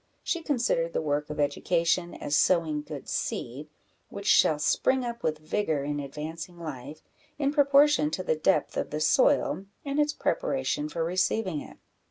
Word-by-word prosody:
She 340 - -1
considered 235 - 0
the - - 0
work 150 0 -1
of 150 - -6
education 170 +4 0
as 145 - -2
sowing 155 0 +2
good 150 -2 -8
seed, 135 +6 -4 0.4
which 200 - -8
shall 155 -6 +5
spring 255 - +1
up 235 0 -5
with 155 -1 -1
vigour 155 -2 -1
in 145 +1 -2
advancing 155 +5 -7
life, 155 -2 -8 0.3
in 280 -1 +1
proportion 285 - +4
to 185 +4 -3
the 160 - +1
depth 155 -1 +1
of - - -2
the 150 - -3
soil 270 - +2 0.2
and 280 +1 -1
its 295 0 +2
preparation 260 - -1
for 165 +1 -2
receiving 185 -1 0
it. - - -12
165 Hz, 165 wpm, -27 LUFS, 150-235 Hz, 0.4 s, shall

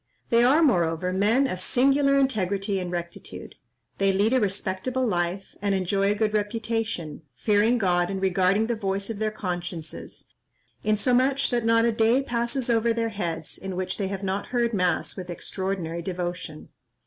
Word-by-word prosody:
They 235 0 +5
are, 285 +7 +5
moreover, 180 - +2
men 215 +8 +3
of 185 -8 -3
singular 275 +5 +3
integrity 200 -6 0
and 180 -1 -4
rectitude. 170 -1 -6 0.5
They 195 0 +3
lead 205 +5 +2
a 260 - +4
respectable 205 +5 -1
life, 180 -2 -2
and 200 -1 +1
enjoy 195 +1 +1
a - - +1
good 215 0 0
reputation, 215 -6 -2
fearing 215 - +3
God 175 -4 +1
and 195 -1 -2
regarding 190 +2 +2
the 235 +1 -1
voice 195 0 -2
of 210 - -6
their 215 0 +1
consciences, 175 -5 -6 0.6
insomuch 255 +6 +2
that 240 -2 0
not 230 0 +4
a 235 - +3
day 230 +4 +3
passes 240 +1 -2
over 230 -1 +2
their 230 0 -1
heads 170 -7 -4
in 190 -1 -5
which 185 +2 -3
they 195 - 0
have 195 0 -5
not 195 +1 -2
heard 240 -2 0
mass 180 -3 0
with 180 -2 -7
extraordinary 175 -1 -3
devotion. 175 -3 -5
200 Hz, 165 wpm, -25 LUFS, 185-230 Hz, 0.6 s, They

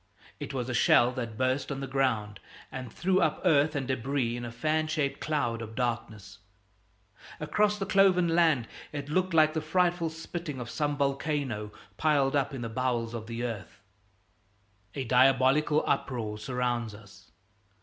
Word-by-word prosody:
It - - -5
was 125 -3 -3
a 130 - -3
shell 120 +1 +5
that 120 -4 -5
burst 130 +3 0
on 135 - -3
the 135 - -3
ground 120 -6 -1 0.3
and 125 -3 -6
threw 185 +7 +1
up - - +1
earth 150 -2 +4
and 135 -3 -2
debris 130 -1 -1
in 120 - -5
a 120 - -5
fan 155 +6 0
shaped 155 -3 -1
cloud 120 -7 -1
of 110 -1 -8
darkness. 110 -5 -3 1.0
Across 210 0 +1
the 195 - -2
cloven 190 -2 +4
land 160 -8 +3 0.2
it 145 -1 -5
looked 185 +2 0
like 155 -1 +5
the 160 - -1
frightful 175 +1 +1
spitting 165 -2 -6
of 120 -1 -6
some 145 -1 -1
volcano, 140 -6 -1 0.3
piled 145 -2 +2
up 140 0 +1
in 135 -3 -6
the 115 - -3
bowels 120 -1 -1
of 110 -2 -6
the 115 +1 -4
earth. 115 -5 -5 1.2
A 135 - -2
diabolical 130 +4 +4
uproar 115 -6 -2
surrounds 120 -1 -2
us. 100 -2 -16
135 Hz, 160 wpm, -29 LUFS, 120-155 Hz, 1.2 s, shell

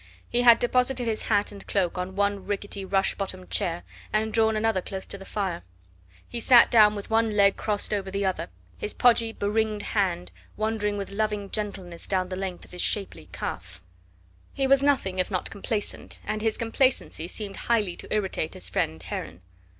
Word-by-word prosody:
He 245 - +1
had 235 -1 +8
deposited 250 +1 +1
his 220 -2 -1
hat 205 -1 +2
and 200 -1 -11
cloak 185 -4 0
on 180 +1 -4
one 200 -1 0
rickety 200 -1 -3
rush 195 0 +1
bottomed 95 - -5
chair, 90 -1 0 0.3
and 215 +1 0
drawn 220 -1 +3
another 215 -3 +1
close 190 +1 -6
to - - -5
the 195 - -10
fire. 190 -5 -2 0.7
He 240 - -5
sat 240 0 +7
down 215 -2 +6
with 205 +1 -7
one 225 0 +3
leg 200 -1 +5
crossed 210 -1 0
over 195 -2 -1
the 200 +1 -1
other, 190 -1 -1 0.3
his 430 - -3
podgy 230 -2 +4
be 205 - -5
ringed 215 0 0
hand 180 - -1 0.3
wandering 215 -1 -1
with 200 -1 -5
loving 210 -1 -2
gentleness 190 -5 -4
down 185 -2 0
the 185 - -3
length 185 -1 -5
of - - -20
his 180 - -4
shapely 195 - -2
calf. - - -6 0.8
He 270 - +1
was 275 0 +5
nothing 260 -10 +1
if 185 - +1
not 185 -3 -2
complacent, 205 +1 -4
and 215 0 -2
his 220 -1 0
complacency 230 - +1
seemed 200 +1 -5
highly 210 -7 +1
to - - -9
irritate 190 -6 -1
his 90 - -4
friend 80 -2 -1
Heron. 90 0 -6
205 Hz, 190 wpm, -26 LUFS, 190-220 Hz, 0.8 s, had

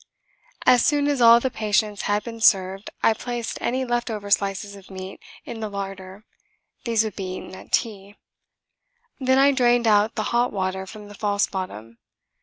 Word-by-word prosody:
As 245 -2 +6
soon 290 -1 +2
as 285 -3 0
all 235 0 +8
the 260 +1 -2
patients 210 -1 0
had 205 0 +1
been 230 -1 -8
served 195 -1 +3
I 225 - +5
placed 240 +1 -5
any 260 +2 -1
left 240 0 -1
over 205 -2 -5
slices 200 0 0
of 195 -1 -15
meat 190 0 -8 0.3
in 230 - -7
the 215 -1 -4
larder: 195 0 -7 0.6
these 230 -2 +2
would 215 -2 -5
be 185 -2 -5
eaten - - -9
at 190 - -12
tea. 205 -2 -2 1.0
Then 260 0 +2
I 275 +1 +6
drained 245 -2 +3
out 215 0 +3
the 215 - -1
hot 240 +1 +2
water 190 -1 -3
from 210 +1 -10
the 205 - -12
false 205 0 0
bottom. 115 - -7
210 Hz, 180 wpm, -23 LUFS, 195-235 Hz, 1.0 s, all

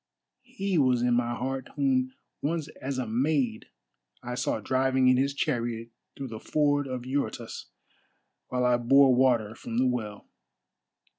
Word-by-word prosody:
He 195 -3 0
was 125 -3 +3
in 125 0 +3
my 120 0 +1
heart 130 +1 -3
whom 130 -3 +1 0.3
once 155 0 -2
as 135 0 -3
a 130 - -1
maid 125 0 0 0.6
I 125 0 -4
saw 125 -2 -1
driving 130 +2 +2
in 130 - +5
his 140 +2 +1
chariot 120 -5 -2 0.3
through 135 -2 -5
the 110 -1 -7
ford 145 0 +1
of 130 -1 -5
Eurotas 130 -3 -3 0.8
while 125 0 0
I 125 -1 +4
bore 135 +2 +5
water 120 -4 +3
from 115 0 -6
the 130 - +3
well. 110 -5 -2
130 Hz, 150 wpm, -28 LUFS, 120-135 Hz, 0.8 s, in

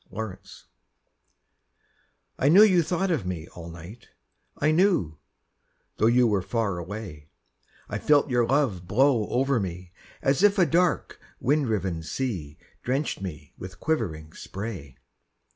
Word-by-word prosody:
Spray 105 -1 -5 2.0
I 140 - +3
knew 190 +7 +8
you 185 -5 +5
thought 180 +4 -1
of 155 - 0
me 85 -3 -4
all 85 -1 -10
night, 85 +8 -11 0.5
I 150 - +2
knew, 155 - +2 0.8
though 110 - +3
you 120 +1 +4
were 105 -4 +2
far 100 -2 -2
away; 85 -5 -8 0.6
I - - -4
felt 150 -1 +3
your 120 -3 +1
love 120 -11 0
blow 120 +1 +3
over 135 0 +1
me 90 -2 -5 0.3
As 135 +5 +2
if 205 0 +4
a 185 - +5
dark 170 +3 +1 0.2
wind 145 +1 +1
riven 95 -6 -1
sea 80 - -4 0.2
Drenched 135 -2 -2
me 75 -6 -7
with 95 0 -9
quivering 80 - -2
spray. 95 - -7
110 Hz, 135 wpm, -26 LUFS, 90-145 Hz, 2.0 s, knew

